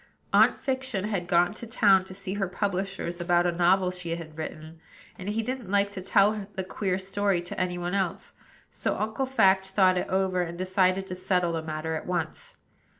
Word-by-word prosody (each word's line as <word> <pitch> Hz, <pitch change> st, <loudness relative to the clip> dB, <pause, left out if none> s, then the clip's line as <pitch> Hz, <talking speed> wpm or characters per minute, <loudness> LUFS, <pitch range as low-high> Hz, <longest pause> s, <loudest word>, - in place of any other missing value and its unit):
Aunt -, -, +5 dB
Fiction 260 Hz, -7 st, -2 dB
had 200 Hz, -5 st, -2 dB
gone 175 Hz, +2 st, +3 dB
to 230 Hz, +2 st, -8 dB
town 200 Hz, -5 st, +4 dB
to 190 Hz, -, -10 dB
see 195 Hz, -1 st, -5 dB
her 200 Hz, -1 st, -1 dB
publishers 190 Hz, -2 st, -3 dB
about 175 Hz, 0 st, +3 dB
a 175 Hz, -, +2 dB
novel 180 Hz, +2 st, +3 dB
she 175 Hz, -2 st, -4 dB
had 160 Hz, -2 st, -9 dB
written, 155 Hz, 0 st, -7 dB, 0.4 s
and 185 Hz, +2 st, -5 dB
he 225 Hz, +2 st, -1 dB
didn't 250 Hz, -4 st, -4 dB
like 200 Hz, 0 st, +2 dB
to 195 Hz, -2 st, -5 dB
tell 200 Hz, +2 st, +2 dB
the 190 Hz, -, -2 dB
queer 185 Hz, 0 st, -2 dB
story 195 Hz, 0 st, 0 dB
to 180 Hz, -, -4 dB
any 180 Hz, -1 st, -1 dB
one 175 Hz, +1 st, -3 dB
else; 190 Hz, -4 st, -2 dB, 0.4 s
so -, -, -2 dB
Uncle 220 Hz, +5 st, -2 dB
Fact 195 Hz, -7 st, +3 dB
thought 190 Hz, -1 st, +3 dB
it -, -, -3 dB
over, 190 Hz, -1 st, +1 dB
and 170 Hz, -1 st, -4 dB
decided 185 Hz, +1 st, +1 dB
to 185 Hz, -, -6 dB
settle 180 Hz, -1 st, 0 dB
the 165 Hz, -, -1 dB
matter 160 Hz, 0 st, -4 dB
at 160 Hz, -, -4 dB
once. 175 Hz, -3 st, -3 dB
185 Hz, 200 wpm, -27 LUFS, 175-200 Hz, 0.4 s, Aunt